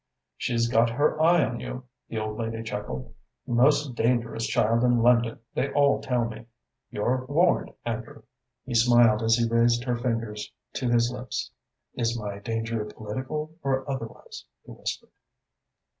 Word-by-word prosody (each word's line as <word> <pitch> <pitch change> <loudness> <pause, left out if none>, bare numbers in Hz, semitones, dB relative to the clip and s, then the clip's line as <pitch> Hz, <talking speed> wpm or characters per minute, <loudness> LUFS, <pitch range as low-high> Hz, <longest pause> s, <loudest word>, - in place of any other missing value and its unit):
"She's 115 -1 0
got 115 0 +3
her 145 +6 +1
eye 165 -1 +5
on 120 - -4
you," 130 0 -6 0.3
the 115 - -4
old 110 0 -3
lady 115 0 -3
chuckled. 105 - -5 0.3
"Most 130 +3 +3
dangerous 120 -1 0
child 115 +2 +2
in 120 -2 +3
London, 120 -1 +4 0.2
they 140 - -1
all 140 0 +3
tell 125 -2 0
me. 115 0 -8 0.4
You're 125 +5 0
warned, 170 +6 +2
Andrew." 120 +5 -5 0.4
He 130 - -5
smiled 120 -2 +5
as 115 0 +4
he 115 -1 +1
raised 120 +1 +3
her 125 -1 0
fingers 115 -3 -3 0.2
to 125 - -1
his 120 0 +3
lips. 125 -2 -5 0.4
"Is 120 -1 -1
my 100 -2 -5
danger 115 0 -2
political 130 +9 -5
or 135 0 -1
otherwise?" 130 -5 -6 0.2
he - - -11
whispered. - - -5
120 Hz, 150 wpm, -26 LUFS, 115-130 Hz, 0.4 s, eye